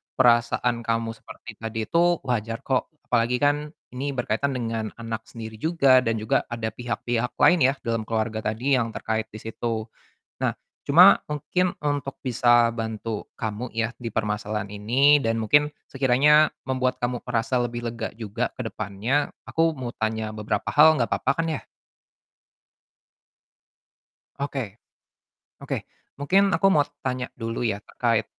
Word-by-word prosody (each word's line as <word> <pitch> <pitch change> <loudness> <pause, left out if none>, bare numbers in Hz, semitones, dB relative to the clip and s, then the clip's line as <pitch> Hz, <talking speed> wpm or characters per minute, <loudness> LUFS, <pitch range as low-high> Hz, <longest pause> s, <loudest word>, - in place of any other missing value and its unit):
perasaan 120 -1 +3
kamu 115 0 -1
seperti 110 -3 -12
tadi 110 0 -3
itu 170 +7 +2
wajar 115 -2 -2
kok 130 -2 0 0.2
apalagi 120 0 +2
kan 145 +1 +1 0.2
ini 140 +3 -2
berkaitan 125 +3 0
dengan 115 -3 -3
anak 115 -1 -4
sendiri 110 -1 -8
juga 140 -4 +4
dan 115 -1 0
juga 110 0 +1
ada 115 -1 -2
pihak-pihak 120 +1 -2
lain 175 - +6
ya - - -4
dalam 115 -1 -1
keluarga 110 -1 -1
tadi 130 +6 +1
yang 115 -1 -2
terkait 110 0 -2
di 110 0 -10
situ, 115 0 -3 0.6
nah - - +3 0.3
cuma - - +7
mungkin 175 +5 -1
untuk 145 -2 -2
bisa 120 -2 +4
bantu 110 -1 -4
kamu 110 +3 -4
ya 115 0 0
di 120 - -4
permasalahan 105 -1 -2
ini 130 +8 +4
dan 115 -3 0
mungkin 145 +7 +3 0.2
sekiranya 140 +3 +4 0.2
membuat 130 -1 0
kamu 120 0 -2
merasa 125 +1 0
lebih 120 0 -3
lega 115 -1 -4
juga 115 +2 -2
ke 125 - -4
depannya 110 +6 -1 0.2
aku 165 -1 +1
mau 125 -2 -5
tanya 110 0 -2
beberapa 105 0 -3
hal 155 +1 +7
nggak 120 -4 0
papa 140 - +1
kan 165 - 0
ya? 150 - -3 2.8
Oke, 135 -7 -4 0.8
oke - - -4 0.3
mungkin 190 +8 +3
aku 195 - +3
mau 145 -4 +4 0.2
tanya 125 -1 -2
dulu 115 -1 -4
ya 100 -3 -1
terkait, 115 -3 0
120 Hz, 145 wpm, -25 LUFS, 110-135 Hz, 2.8 s, cuma